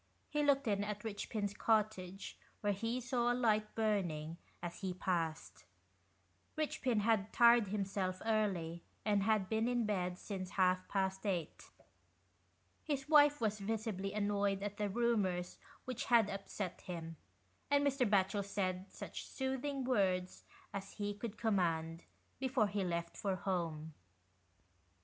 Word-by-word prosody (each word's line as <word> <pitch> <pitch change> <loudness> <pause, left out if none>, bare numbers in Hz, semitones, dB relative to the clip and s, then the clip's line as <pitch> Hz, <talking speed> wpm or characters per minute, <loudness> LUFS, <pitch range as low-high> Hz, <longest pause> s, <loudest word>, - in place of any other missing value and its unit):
He 295 - +1
looked 280 -2 +3
in 205 -1 +1
at 210 0 -3
Eichpin's 205 -1 -3
cottage, 205 -4 0 0.3
where 205 -1 +2
he 230 +5 -2
saw 240 -1 +1
a - - +1
light 215 -3 +2
burning, 175 -8 0 0.2
as 175 -1 -6
he 185 -2 -2
passed. 170 -4 -2 0.9
Eichpin 260 -7 0
had 215 -2 +2
tired 235 -2 +6
him 200 0 -1
self 185 -1 -2
early, 190 -7 0 0.2
and 205 -2 +3
had 210 -2 +2
been 220 +2 +1
in 245 -2 +1
bed 180 -4 -1
since 185 -2 -5
half 185 -1 +3
past 190 -1 -1
eight. 175 -6 -3 1.1
His 280 -3 -2
wife 295 -1 +6
was 215 -2 0
visibly 205 -2 -2
annoyed 205 -1 0
at 205 0 -4
the 210 -1 0
rumours 200 -5 0 0.3
which 255 -2 -3
had 230 -4 +4
upset 195 -1 -5
him, 165 -2 -6 0.5
and 285 0 +4
Mr. 270 -5 +2
Batchel 200 0 +2
said 190 -1 -2
such - - -7
soothing 265 +1 -2
words 190 -7 +1 0.3
as 195 -1 -5
he 205 -1 -2
could 215 +1 -6
command, 165 -6 0 0.3
before 260 -4 +2
he 200 -1 -1
left 170 -1 -2
for 195 -2 -1
home. 165 -4 -2
205 Hz, 140 wpm, -36 LUFS, 185-225 Hz, 1.1 s, tired